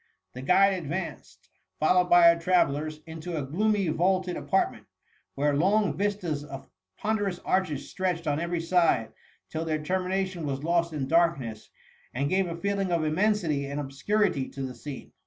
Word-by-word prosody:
The 125 - -7
guide 195 +7 +4
advanced. 175 0 -5
SIO - - -31
THE - - -47
MUMMY. 95 +2 -46 0.2
followed 180 -1 +3
by 170 -1 +8
our 170 - -6
travellers, 155 -3 +1
into 165 +1 -6
a 145 - -2
gloomy 200 +6 +1
vaulted 180 +3 +1
apartment, 190 - -1 0.5
where 145 +1 +1
long 200 +7 +2
viatas 190 -8 -2
of 135 -2 -9 0.3
pon 220 0 0
derous 195 -3 -2
arches 155 -7 0
stretched 180 -3 -2
on 145 -1 0
every 170 0 -2
side, 165 -10 +2 0.4
tilj. 160 +1 -3
their 155 -1 -1
termination 185 -1 -1
was 135 0 -3
lost 170 0 +1
in 145 -4 -3
darkness, 150 -10 +1 0.5
and 140 +3 -1
gave 190 0 +2
a 170 -1 -5
feeling 200 0 -1
of 170 -2 +1
immensity 160 -3 +1
and 140 +1 -4
obscurity 145 +2 0
to 135 - -6
the 130 -1 -4
scene. 135 +3 -9
170 Hz, 175 wpm, -27 LUFS, 145-185 Hz, 0.5 s, by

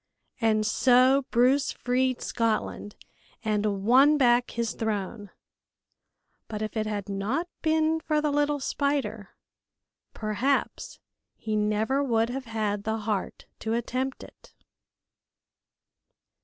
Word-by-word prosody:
And 215 -1 +2
so 255 +4 +4
Bruce 255 +4 +3
freed 255 0 -1
Scotland 220 -2 -2 0.5
and 210 -2 0
won 270 +6 +6
back 245 -2 +3
his 235 -2 -2
throne, 205 -1 -3 1.2
but 215 -1 -4
if 215 - -5
it 215 -1 -1
had 205 -2 -3
not 205 - -2
been 315 0 +2
for 310 -1 0
the 300 -1 0
little 290 0 +1
spider, 280 +1 -2 0.8
perhaps 235 +6 -1 0.4
he 215 -1 -4
never 215 +6 +1
would 230 -3 +1
have 265 +1 -5
had 215 -3 -2
the 220 +1 -1
heart 210 -2 -3
to 225 +1 -2
attempt 255 +3 -3
it. - - -17
235 Hz, 115 wpm, -27 LUFS, 215-270 Hz, 1.2 s, won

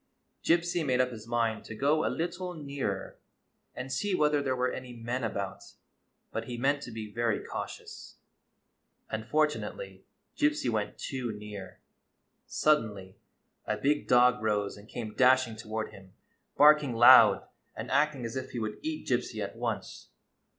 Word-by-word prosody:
Gypsy 170 0 +2
made 130 -4 +1
up 125 0 +2
his 110 -2 -9
mind 115 -2 0
to 110 - -7
go 145 +6 +2
a - - +1
little 175 +2 -3
nearer 140 -10 -4 0.6
and 130 +1 -5
see 205 -2 0
whether 150 -3 +2
there 130 -2 0
were 125 0 0
any 125 -1 -7
men 120 +2 -4
about; 100 -2 -5 0.6
but 115 - -3
he 120 0 -5
meant 140 +3 +1
to 120 - -8
be 110 -2 -7
very 115 -2 0
cautious. - - -7 1.0
Unfortunately 150 - -2 0.3
Gypsy 295 - +1
went 105 -2 -2
too 130 -4 -4
near. 105 -2 -9 0.7
Sud 150 0 +3
denly 100 -4 -9 0.5
a - - 0
big 145 +2 +1
dog 125 -2 +5
rose 105 -2 0
and 105 +2 -15
came 110 -3 -6
dashing 130 -2 +4
toward 110 0 -4
him, 95 -1 -15 0.4
barking 150 -4 +6
loud 120 +1 +8 0.3
and - - -6
acting 140 -2 +2
as 115 - -5
if 130 0 -4
he 120 - -3
would 110 -1 -4
eat 315 0 -4
Gypsy - - -1
at - - -6
once. - - -4
125 Hz, 155 wpm, -29 LUFS, 110-145 Hz, 1.0 s, loud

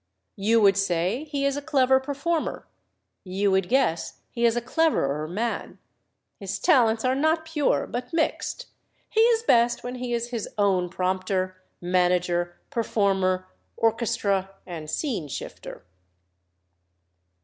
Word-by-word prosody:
You 220 +3 +3
would 200 -2 +5
say 195 - 0
he 285 -2 -2
is 280 0 +1
a 290 - -3
clever 265 -3 +3
performer 285 +4 -2 0.6
you 195 +2 0
would 190 -1 +1
guess 250 -11 0
he 235 0 0
is 230 0 +3
a - - +2
cleverer 235 - +1
man. 220 +8 -3 0.6
His 195 -1 -4
talents 230 - +3
are 255 - +3
not 315 +4 +1
pure, 315 -3 +1
but 245 +1 -5
mixed. 335 +9 -1 0.5
He 440 - +1
is 455 0 +4
best 240 - +3
when 245 - -4
he 250 -1 -4
is 235 0 -1
his 230 -4 -3
own 190 -3 +2
prompter, 185 0 -2 0.2
manager, 175 -1 +1
performer, 195 -6 +1 0.3
orchestra, 225 -4 +1 0.2
and 160 -4 -7
scene 215 - -2
shifter." - - -8
225 Hz, 130 wpm, -25 LUFS, 185-265 Hz, 0.6 s, would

